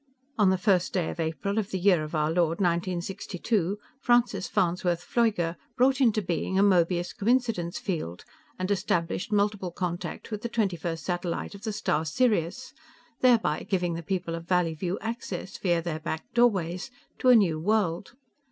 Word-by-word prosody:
On 205 -3 +4
the 190 - +3
first 185 -2 +2
day 180 -4 0
of - - -9
April 170 +6 -1
of 210 -2 -3
the 190 - -2
year 180 -3 +3
of 155 +2 -5
our 155 0 +1
Lord, 170 -1 +1
1962, 185 +2 -1 0.2
Francis 240 -7 +2
Farnsworth 175 -1 0
Pfleuger 200 -8 +1 0.2
brought 265 +2 +3
into 220 -4 +3
being 180 +2 -1
a 195 - +5
Möbius 175 -2 +2
coincidence 225 -6 0
field 155 - -4 0.3
and 185 +2 -2
established 180 0 -1
multiple 205 -2 +1
contact 175 +4 -4
with 210 -1 -3
the 235 - -3
twenty 215 -6 0
first 165 -2 -4
satellite 175 0 -2
of 200 +2 -10
the 220 - -1
star 180 -7 0
Sirius, 210 - 0 0.5
thereby 230 -11 +3
giving 180 -3 0
the 165 - -4
people 180 -1 -3
of 165 0 -6
Valleyview 180 0 0
access, 220 -5 -5
via 175 -3 +1
their 160 -2 -3
back 160 - -5
doorways, 190 -7 +2 0.3
to 255 - +3
a 250 - +9
New 175 -8 +3
World. 190 0 0
185 Hz, 165 wpm, -27 LUFS, 170-210 Hz, 0.5 s, a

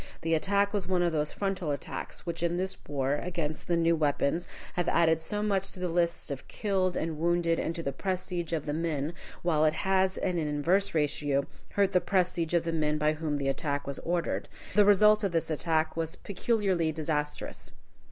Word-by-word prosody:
The 165 0 +1
attack 200 +5 +2
was 205 -3 -1
one 180 -1 +2
of 170 - +2
those 150 -1 0
frontal 195 -5 -2
attacks, 145 +4 -5
which 170 -1 -3
in 170 0 +1
this 190 +1 -1
war, 140 0 0
against 165 -3 -3
the 170 - +2
new 165 0 +3
weapons, 155 +2 0 0.3
have 175 -1 0
added 160 -1 +3
so 210 +6 -1
much 195 -2 0
to 185 - -9
the 180 - -1
lists 170 -2 0
of 135 - -6
killed 190 -4 0
and 160 -1 -2
wounded 170 0 +2
and 165 - -2
to 165 - -4
the 140 - -1
prestige 180 +1 -3
of 160 -3 -1
the 145 - -2
men, 155 -1 -1 0.3
while 160 -3 +2
it 155 0 +4
has, 190 +2 +1
in 180 -2 0
an 155 - -1
inverse 170 +7 +1
ratio, 145 -2 +1 0.3
hurt 200 -1 +3
the 180 -2 +3
prestige 175 -2 +1
of 170 - +3
the 165 - -1
men 150 -1 +1
by 150 0 +2
whom 155 -1 -2
the 140 -1 -2
attack 140 +1 -1
was 140 -1 -4
ordered. 170 0 -1 0.2
The 210 -1 +6
result 210 +1 +6
of 195 -3 0
this 165 -1 0
attack 160 0 0
was 160 -1 -2
peculiarly 195 -5 0
disastrous. 150 -1 -3
165 Hz, 200 wpm, -29 LUFS, 155-185 Hz, 0.3 s, The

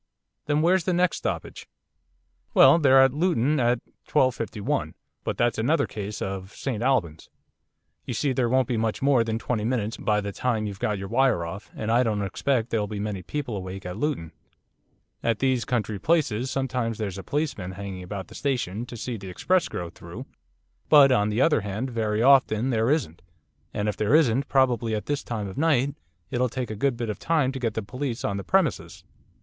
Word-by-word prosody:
'Then 150 +1 +2
where's 180 +1 +3
the 185 - +1
next 180 -1 +2
stoppage?' - - -5 0.9
'Well, 135 +5 +7
they're 135 -3 +6
at 135 -1 +3
Luton 150 -3 +1
at 120 -1 +2 0.3
12.51. 115 -7 0 0.3
But - - -3
that's 120 -2 +1
another 145 +9 +2
case 105 0 -5
of 95 +1 -5
St 120 -6 -3
Albans. 110 - 0 0.8
You 120 - -3
see 140 +3 0
there 125 -2 +1
won't 130 0 +2
be 120 - -1
much 110 +2 -1
more 135 -4 +4
than 110 -1 -2
twenty 115 -1 -2
minutes 115 -2 -1
by 105 -1 +1
the 100 -1 -4
time 110 0 -1
you've 100 -2 -6
got 105 -1 0
your 95 0 -5
wire 120 -6 +2
off, 100 +5 -8
and 110 +1 -2
I 120 +2 +4
don't 105 -4 0
expect 120 +4 -1
there'll 105 -2 0
be 105 0 -5
many 105 -2 -3
people 135 +3 -4
awake 95 0 -6
at 90 0 -5
Luton. 115 - -2 0.9
At 115 -2 +1
these 130 -3 +1
country 110 -5 -1
places 135 - +1
sometimes 125 -4 -2
there's 100 -3 -4
a - - -7
policeman 135 - -2
hanging 95 -1 -6
about 95 +1 -6
the - - -14
station 120 -5 -2
to 120 - -8
see 120 +1 -4
the 95 -2 -8
express 180 - +1
go 85 -1 -5
through, - - -10 0.6
but, 145 -3 +8
on 105 -4 +3
the 110 +4 0
other 150 -6 +4
hand, 105 +6 -4
very 110 -1 0
often 130 -2 +4
there 115 0 +1
isn't, 140 - -1 0.5
and 105 0 -2
if 105 - -2
there 110 +7 +3
isn't, 135 -3 +3
probably 120 -4 +2
at 105 - -4
this 145 -1 -2
time 110 -4 -4
of 95 - -6
night 145 -3 +2 0.4
it'll 125 +1 +1
take 125 -1 -4
a - - -4
good 125 +3 0
bit 120 -2 -2
of - - -8
time 150 -5 +1
to 135 - -5
get 115 -4 -2
the 110 - -2
police 125 +2 -4
on 100 - -1
the 100 - -4
premises. 85 - 0
115 Hz, 200 wpm, -25 LUFS, 105-135 Hz, 0.9 s, but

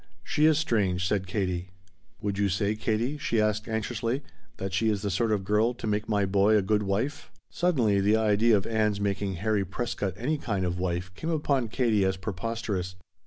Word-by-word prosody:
"She 150 +1 +3
is 155 -2 +4
strange," 95 - +1
said 95 -2 0
Katie. 95 -2 -2 0.5
"Would 100 -1 -2
you 100 -1 +2
say, 100 +2 +1
Katie," 110 +7 -1
she 115 -5 0
asked 105 0 +1
anxiously, 115 +4 -2 0.3
"that 95 -1 -4
she 110 +3 +2
is 105 -1 -1
the 100 - -1
sort 110 +4 +1
of 100 -2 +1
girl 105 +5 +2
to - - -7
make 105 0 -1
my 105 -2 +2
boy 100 +2 +4
a 100 - +2
good 105 +2 +2
wife?" 105 +9 -2 0.2
Suddenly 125 - +2
the 105 +2 +4
idea 110 +1 +4
of 95 - -2
Ann's 110 -2 +1
making 100 -1 -1
Harry 105 +2 0
Prescott 100 -1 -3
any 150 +6 -1
kind 100 -7 -1
of 90 0 -2
wife 90 0 -2
came 160 - -5
upon 145 -6 +1
Katie 110 -3 +1
as 95 0 +1
preposterous. 95 -1 -3
105 Hz, 195 wpm, -27 LUFS, 95-115 Hz, 0.5 s, is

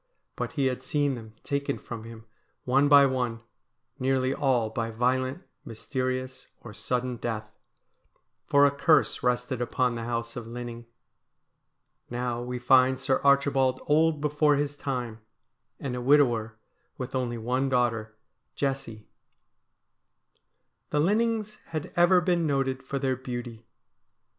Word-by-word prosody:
But - - -4
he 140 -4 0
had 130 -1 -1
seen 145 +1 0
them 110 -3 -9
taken 140 0 -2
from 115 -2 -8
him 115 -1 -11 0.4
one 135 +3 +3
by 140 -1 +8
one, 125 -4 -1 0.6
nearly 130 0 +1
all 125 -6 +1
by 115 0 -2
violent, 130 +7 0 0.2
mysterious, 130 +2 -4
or 110 - -10
sudden 125 +4 -2
death; 110 -2 -4 1.0
for 140 0 +5
a 140 - +4
curse 140 +3 +2
rested 125 0 0
upon 125 0 0
the 115 -1 -5
house 115 -1 -3
of 120 -2 -6
Linning. 120 0 -7 1.2
Now 120 0 -2
we 125 +1 -4
find 130 +1 +4
Sir 130 0 +1
Archibald 140 -2 +3
old 155 0 +3
before 150 0 +3
his 145 0 -1
time, 125 -6 -4 0.6
and 130 -3 -4
a 125 - -4
widower 120 -5 +3 0.4
with 125 -1 -6
only 125 -2 -1
one 125 +4 0
daughter, 115 -4 0 0.4
Jessie. 135 -6 -3 1.8
The 150 - 0
Linnings 215 +4 +1
had 155 -2 -5
ever 175 +1 +5
been 175 -2 +1
noted 135 -2 0
for 135 +1 -4
their 135 -1 0
beauty. 120 -3 -7
130 Hz, 135 wpm, -27 LUFS, 120-140 Hz, 1.8 s, by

